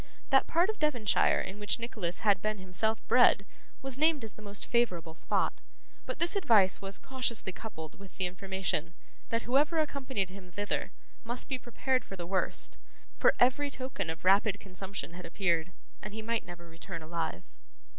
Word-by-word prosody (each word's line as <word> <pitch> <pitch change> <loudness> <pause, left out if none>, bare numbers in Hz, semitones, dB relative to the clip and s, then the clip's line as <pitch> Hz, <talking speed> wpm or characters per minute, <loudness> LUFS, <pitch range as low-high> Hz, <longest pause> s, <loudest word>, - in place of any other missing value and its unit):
That 270 - +5
part 340 +3 +3
of 435 - -13
Devonshire 245 -9 +3
in 195 +3 -6
which 205 -1 +1
Nicholas 215 -7 -3
had 200 -3 +4
been 215 0 -1
himself 195 +4 -1
bred 245 -5 +6 0.4
was 270 0 -3
named 310 -4 +4
as 220 -2 -4
the - - -14
most 205 -1 -6
favourable 180 -9 +1
spot; - - +1 0.5
but - - -3
this 340 +4 +1
advice 220 - +4
was 195 0 -4
cautiously 250 -7 -2
coupled 160 -8 -8
with 195 -1 -13
the 190 - 0
information, 180 -3 -2 0.3
that 230 0 0
whoever 290 +6 +3
accompanied 265 - -1
him 190 -1 -11
thither 205 +3 -2 0.3
must 240 +2 -4
be 260 -2 -2
prepared 255 +2 0
for 195 - -8
the 175 -2 -5
worst; 185 +1 0 0.4
for - - +5
every 265 +4 +4
token 255 -10 -4
of 160 +2 -5
rapid 200 +2 +4
consumption 190 -2 -6
had 180 +1 -8
appeared, 175 -3 +1 0.3
and 210 0 -7
he 220 - -5
might 230 -2 -1
never 175 -1 -9
return 165 0 -8
alive. 160 - -3
205 Hz, 175 wpm, -31 LUFS, 185-245 Hz, 0.5 s, bred